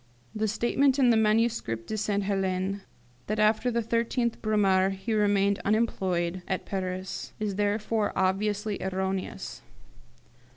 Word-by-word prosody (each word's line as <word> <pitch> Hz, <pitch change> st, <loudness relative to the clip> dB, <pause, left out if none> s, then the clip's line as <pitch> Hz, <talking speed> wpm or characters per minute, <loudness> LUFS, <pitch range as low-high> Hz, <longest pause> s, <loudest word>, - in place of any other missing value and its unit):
The 215 Hz, 0 st, 0 dB
statement 255 Hz, +6 st, +2 dB
in 255 Hz, -3 st, +5 dB
the -, -, +4 dB
'Manuscrit 215 Hz, -, +1 dB
de 220 Hz, -, -4 dB
Sainte 205 Hz, -1 st, 0 dB
Helene, 195 Hz, 0 st, -1 dB, 0.5 s
that 215 Hz, -, -1 dB
after 215 Hz, +3 st, +3 dB
the 235 Hz, -1 st, 0 dB
13th 235 Hz, +1 st, 0 dB
Brumaire 195 Hz, -3 st, +3 dB
he 195 Hz, +4 st, -3 dB
remained 200 Hz, -1 st, +2 dB
unemployed 185 Hz, -5 st, 0 dB
at 190 Hz, -, -2 dB
Paris, 185 Hz, -1 st, -4 dB
is 210 Hz, -2 st, -1 dB
therefore 210 Hz, +2 st, 0 dB
obviously 205 Hz, +2 st, 0 dB
erroneous. 190 Hz, 0 st, -3 dB
205 Hz, 125 wpm, -28 LUFS, 190-220 Hz, 0.5 s, in